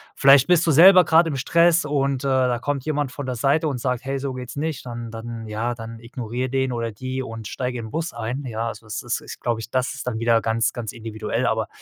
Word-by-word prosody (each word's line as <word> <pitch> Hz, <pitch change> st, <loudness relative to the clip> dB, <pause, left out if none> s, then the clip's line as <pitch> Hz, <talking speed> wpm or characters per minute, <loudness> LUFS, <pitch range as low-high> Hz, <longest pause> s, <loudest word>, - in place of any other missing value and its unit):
Vielleicht 135 Hz, +1 st, +6 dB
bist 175 Hz, -1 st, +3 dB
du -, -, +4 dB
selber 180 Hz, +4 st, +8 dB
grad 165 Hz, +1 st, +5 dB
im 145 Hz, -4 st, -2 dB
Stress 170 Hz, +3 st, +3 dB
und, 140 Hz, -2 st, 0 dB
äh, -, -, +1 dB
da 130 Hz, -2 st, +2 dB
kommt 140 Hz, +1 st, -2 dB
jemand 145 Hz, -4 st, -1 dB
von 145 Hz, -, -6 dB
der 130 Hz, -1 st, -3 dB
Seite 140 Hz, +6 st, +2 dB
und 135 Hz, -3 st, -3 dB
sagt: 125 Hz, 0 st, -2 dB
„Hey, 135 Hz, 0 st, -2 dB
so 135 Hz, -1 st, -3 dB
geht's 125 Hz, +1 st, -7 dB
nicht.“ 155 Hz, -2 st, -3 dB
Dann 120 Hz, -1 st, -6 dB
dann 115 Hz, 0 st, -7 dB
ja, 115 Hz, +3 st, -2 dB
dann 115 Hz, 0 st, -8 dB
ignoriere 120 Hz, +1 st, -4 dB
den 130 Hz, -1 st, 0 dB
oder 115 Hz, -1 st, -2 dB
die 130 Hz, +4 st, -4 dB
und 115 Hz, -3 st, -7 dB
steige 125 Hz, -1 st, -3 dB
in 115 Hz, -, -6 dB
'n -, -, -12 dB
Bus 165 Hz, +4 st, -2 dB
ein. 120 Hz, +4 st, -4 dB
Ja, 115 Hz, -1 st, -3 dB
also, 115 Hz, -, -10 dB
es 105 Hz, -, -4 dB
ist -, -, -2 dB
ist, -, -, -9 dB
glaube 115 Hz, -2 st, -1 dB
ich 115 Hz, -, -9 dB
das 130 Hz, 0 st, 0 dB
ist 140 Hz, -, -7 dB
dann 110 Hz, -3 st, -2 dB
wieder 115 Hz, 0 st, +3 dB
ganz 115 Hz, +2 st, 0 dB
ganz 115 Hz, -3 st, -5 dB
individuell, 110 Hz, -2 st, -3 dB
aber -, -, 0 dB
125 Hz, 255 wpm, -23 LUFS, 115-140 Hz, -, selber